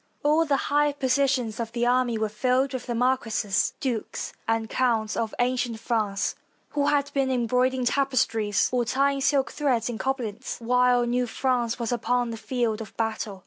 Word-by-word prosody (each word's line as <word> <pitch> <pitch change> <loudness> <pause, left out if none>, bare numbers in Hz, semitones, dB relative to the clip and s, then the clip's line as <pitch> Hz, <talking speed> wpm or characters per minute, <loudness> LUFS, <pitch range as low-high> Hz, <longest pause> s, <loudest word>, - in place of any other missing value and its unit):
All 305 +3 +3
the 285 -3 +2
higher 295 0 +3
positions 265 -4 0
of 230 -1 -4
the 240 0 0
army 245 -1 +2
were 220 0 0
filled 255 +5 0
with 260 - -5
the 240 - -2
marquises, 230 -5 +1
dukes, 245 -6 -3
and 225 0 0
counts 225 -3 0
of 225 -1 -2
ancient 245 -2 0
France, 215 -4 -1 0.4
who 285 -1 0
had 285 -1 +1
been 270 -1 +1
embroidering 250 +1 +1
tapestries 230 -6 +1
or 250 -1 +1
tying 275 +3 +1
silk 275 -1 +2
threads 255 -6 0
in 230 -2 -5
Coblentz 250 -3 -3
while 245 +1 +3
new 245 +1 0
France 240 -1 0
was 235 -2 -3
upon 245 0 0
the 225 - -5
field 230 -2 -1
of 215 - -10
battle. 220 -3 -2
245 Hz, 170 wpm, -26 LUFS, 225-265 Hz, 0.4 s, All